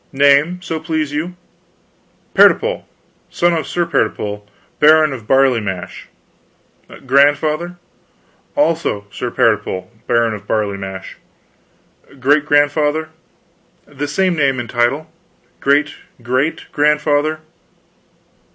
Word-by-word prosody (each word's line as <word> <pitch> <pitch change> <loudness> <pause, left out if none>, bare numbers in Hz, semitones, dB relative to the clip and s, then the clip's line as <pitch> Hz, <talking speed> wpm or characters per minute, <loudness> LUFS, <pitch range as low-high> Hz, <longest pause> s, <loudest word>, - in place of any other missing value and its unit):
"Name, 145 +5 +3
so 165 -3 -3
please 155 -2 -2
you?" 170 +4 -3 1.0
"Pertipole, - - +4 0.4
son 175 0 +1
of 160 -3 -2
Sir 175 -1 -1
Pertipole, 105 -9 -2 0.4
Baron 155 -1 +5
of 115 -5 -9
Barley 135 -2 +3
Mash." 95 -4 -6 1.0
"Grandfather?" 150 +5 +2 0.8
"Also 165 - 0
Sir 125 - -4
Pertipole, 105 -4 0 0.2
Baron 115 -2 +2
of 105 - -9
Barley 105 -2 -1
Mash." 95 -1 -8 1.0
"Great 145 +3 +2
grandfather?" 150 +2 +2 0.8
"The 145 +1 -5
same 180 +4 +1
name 135 -4 +1
and 120 - -5
title." 125 +6 0 0.5
"Great 145 +2 +2 0.3
great 130 +6 -1
grandfather?" 150 +1 +1
145 Hz, 100 wpm, -17 LUFS, 120-155 Hz, 1.0 s, Baron